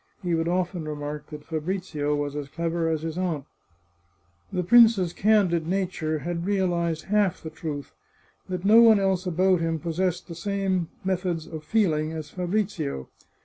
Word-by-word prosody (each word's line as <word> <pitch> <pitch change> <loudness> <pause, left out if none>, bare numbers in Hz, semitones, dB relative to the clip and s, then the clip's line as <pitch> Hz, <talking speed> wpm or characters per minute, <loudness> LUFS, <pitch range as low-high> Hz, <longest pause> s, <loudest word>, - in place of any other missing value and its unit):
He 175 -1 0
would 165 0 +1
often 180 -1 -1
remark 150 0 -5
that 150 -1 -9
Fabrizio 160 -2 -2
was 145 0 -3
as 145 -2 -5
clever 165 +1 -1
as 160 -1 -1
his 165 +1 -3
aunt. 165 -7 -2 1.1
The 180 - -1
prince's 215 -3 +6
candid 190 -6 +2
nature 180 -4 -1
had 170 -1 -2
realized 175 -5 0
half 205 -3 +1
the 160 - -6
truth, 145 -3 -6 0.6
that 185 0 -4
no 220 +3 +8
one 225 -3 +7
else 190 -1 0
about 180 +1 +3
him 165 0 0
possessed 175 +2 -2
the 170 - -7
same 190 0 -1 0.2
meth 185 0 -1
ods 165 -3 -2
of 160 -2 -8
feeling 160 -7 +1
as 155 -2 -6
Fabrizio. 180 - -2
170 Hz, 160 wpm, -26 LUFS, 155-190 Hz, 1.1 s, no